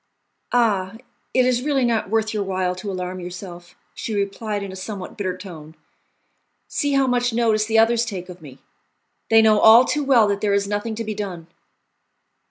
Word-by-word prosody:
"Ah! 210 Hz, -5 st, +1 dB, 0.4 s
it 255 Hz, -1 st, +3 dB
is 250 Hz, -1 st, +1 dB
really 275 Hz, -2 st, +1 dB
not 230 Hz, -5 st, 0 dB
worth 220 Hz, 0 st, 0 dB
your 210 Hz, -, -1 dB
while 185 Hz, -2 st, -1 dB
to 185 Hz, +3 st, -7 dB
alarm 185 Hz, 0 st, -5 dB
yourself," 175 Hz, -1 st, -9 dB, 0.2 s
she 220 Hz, -, -5 dB
replied 205 Hz, +1 st, -3 dB
in 195 Hz, -, -6 dB
a -, -, -9 dB
somewhat 190 Hz, 0 st, -7 dB
bitter 185 Hz, -4 st, -3 dB
tone; 160 Hz, -5 st, -11 dB, 0.9 s
"see 285 Hz, -2 st, -1 dB
how 275 Hz, -1 st, +3 dB
much 245 Hz, -1 st, 0 dB
notice 220 Hz, -2 st, +1 dB
the 225 Hz, 0 st, +1 dB
others 230 Hz, +1 st, +4 dB
take 195 Hz, -6 st, -6 dB
of 180 Hz, -1 st, -11 dB
me! 135 Hz, -4 st, -12 dB, 0.7 s
They 225 Hz, 0 st, +6 dB
know 220 Hz, +3 st, +7 dB
too 295 Hz, -, 0 dB
well 250 Hz, -6 st, +4 dB
that 200 Hz, 0 st, -1 dB
there 205 Hz, -1 st, +1 dB
is 200 Hz, 0 st, 0 dB
nothing 205 Hz, +2 st, -3 dB
to 230 Hz, -, -4 dB
be 215 Hz, -1 st, -4 dB
done." 190 Hz, -5 st, -6 dB
210 Hz, 180 wpm, -22 LUFS, 185-230 Hz, 0.9 s, know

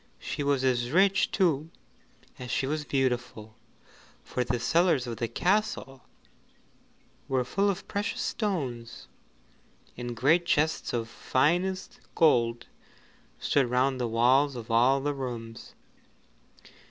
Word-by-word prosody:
She -, -, -5 dB
was 140 Hz, -2 st, +1 dB
as 120 Hz, -2 st, +1 dB
rich 195 Hz, +6 st, +3 dB
too 160 Hz, -5 st, +1 dB, 0.7 s
as 125 Hz, -1 st, -7 dB
she 130 Hz, -, 0 dB
was 150 Hz, +2 st, -2 dB
beautiful, 125 Hz, -5 st, -2 dB, 0.7 s
for 125 Hz, -, -2 dB
the 125 Hz, 0 st, -2 dB
cellars 165 Hz, +1 st, +2 dB
of 115 Hz, -2 st, -5 dB
the 120 Hz, -, -2 dB
castle 180 Hz, -, -1 dB, 1.3 s
were 130 Hz, -2 st, +1 dB
full 200 Hz, +10 st, +1 dB
of 195 Hz, -1 st, -4 dB
precious 205 Hz, +3 st, -3 dB
stones, 135 Hz, -, -3 dB, 0.9 s
and 120 Hz, -1 st, -6 dB
great 165 Hz, +8 st, +3 dB
chests 155 Hz, 0 st, +1 dB
of 115 Hz, -2 st, -1 dB
the 115 Hz, -, -17 dB
finest 175 Hz, +8 st, 0 dB, 0.2 s
gold 120 Hz, -7 st, +3 dB, 0.7 s
stood 135 Hz, -4 st, +1 dB
round 130 Hz, +1 st, +1 dB
the 120 Hz, -, 0 dB
walls 130 Hz, +5 st, +3 dB
of 115 Hz, -1 st, -7 dB
all 125 Hz, +4 st, +4 dB
the 145 Hz, +1 st, -1 dB
rooms. 120 Hz, -4 st, -7 dB
135 Hz, 125 wpm, -28 LUFS, 120-160 Hz, 1.3 s, all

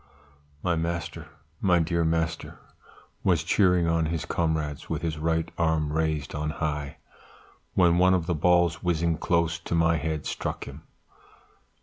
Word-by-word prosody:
"My 85 Hz, -2 st, +1 dB
master, 85 Hz, +1 st, -3 dB, 0.3 s
my 90 Hz, -3 st, +3 dB
dear 85 Hz, 0 st, +1 dB
master 80 Hz, 0 st, -1 dB, 0.7 s
was 85 Hz, -4 st, +2 dB
cheering 90 Hz, -1 st, +3 dB
on 85 Hz, -1 st, +1 dB
his 80 Hz, -2 st, -3 dB
comrades 80 Hz, -3 st, -2 dB
with -, -, -3 dB
his 80 Hz, -2 st, -2 dB
right 80 Hz, +1 st, 0 dB
arm 80 Hz, -3 st, +1 dB
raised 80 Hz, -3 st, -1 dB
on 75 Hz, +1 st, -2 dB
high, 75 Hz, -2 st, -3 dB, 0.8 s
when 85 Hz, -1 st, +4 dB
one 95 Hz, +1 st, +5 dB
of 85 Hz, -3 st, -1 dB
the 85 Hz, -, 0 dB
balls 85 Hz, +1 st, +2 dB
whizzing 85 Hz, -2 st, 0 dB
close 85 Hz, -1 st, +1 dB
to 85 Hz, -, -3 dB
my 85 Hz, 0 st, +3 dB
head 80 Hz, +1 st, -3 dB
struck -, -, -3 dB
him. 70 Hz, +2 st, -10 dB
80 Hz, 145 wpm, -26 LUFS, 80-85 Hz, 0.8 s, one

